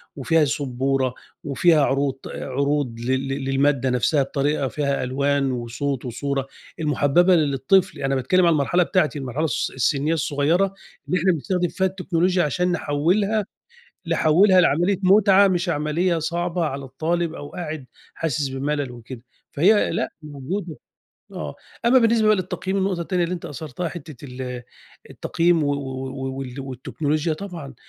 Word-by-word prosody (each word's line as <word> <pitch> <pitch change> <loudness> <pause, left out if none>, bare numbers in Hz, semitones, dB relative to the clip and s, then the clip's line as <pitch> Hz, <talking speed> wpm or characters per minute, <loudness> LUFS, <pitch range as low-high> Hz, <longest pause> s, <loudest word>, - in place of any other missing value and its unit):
وفيها 155 +3 +2
سُبورة 135 -1 -1 0.3
وفيها 155 +2 +3
عروض- 135 -1 -1
عروض 140 -3 -2
لل 130 +3 -1
لل 135 0 -3
للمادة 135 -1 +2
نفسها 130 +4 +2
بطريقة 140 0 -1
فيها 140 -1 -1
ألوان 140 +1 0
وصوت 125 +2 -3
وصورة 135 +2 -3 0.3
المُحبّبة 155 +4 +3
ل - - +4
للطفل، 140 +8 +2
أنا 135 0 0
باتكلّم 175 +8 +2
عن 170 - +5
المرحلة 155 +5 +2
بتاعتي، 155 -6 0
المرحلة 135 +4 -2
الس 135 - -1
السنية 140 +5 +1
الصغيّرة، 165 +5 +1 0.3
اللي 180 - +1
إحنا 185 +3 +3
بنستخدم 175 +3 -1
فيها 190 +2 0
التكنولوجيا 180 -1 0
عشان 180 +5 0
نحولها 180 +7 +1 0.6
نحولها 170 +4 +5
لعملية 175 +4 +2
مُتعة 200 +1 +6
مش 180 -1 0
عمليّة 165 +3 0
صعبة 170 +1 -1
على 140 -2 -4
الطالب 160 +5 -2
أو 145 - -8
قاعد 155 -5 -6 0.3
حاسس 150 -3 -1
بملل 140 0 -2
وكده. 120 0 -10 0.3
فهي 205 +8 +3
لأ - - -1
موجودة، 155 +4 -5 0.6
آه، - - -6 0.3
أمّا 255 +2 +6
بالنسبة 230 -2 +3
بقي 215 0 +5
للتقييم، 190 +1 -3
النقطة 190 -2 0
التانية 175 +1 0
اللي 170 - -3
أنت 170 - -8
أثرتها 155 +3 -5
حتّة 155 -6 -10
ال 125 -1 -6 0.5
التقييم 170 -1 +1
و 145 - +1
و - - +1
و 135 -1 -5
و 130 0 -6
وال 135 0 -6
والتكنولوجيا 145 +4 -2
طبعًا، 160 -5 -7
150 Hz, 150 wpm, -23 LUFS, 135-175 Hz, 0.6 s, مُتعة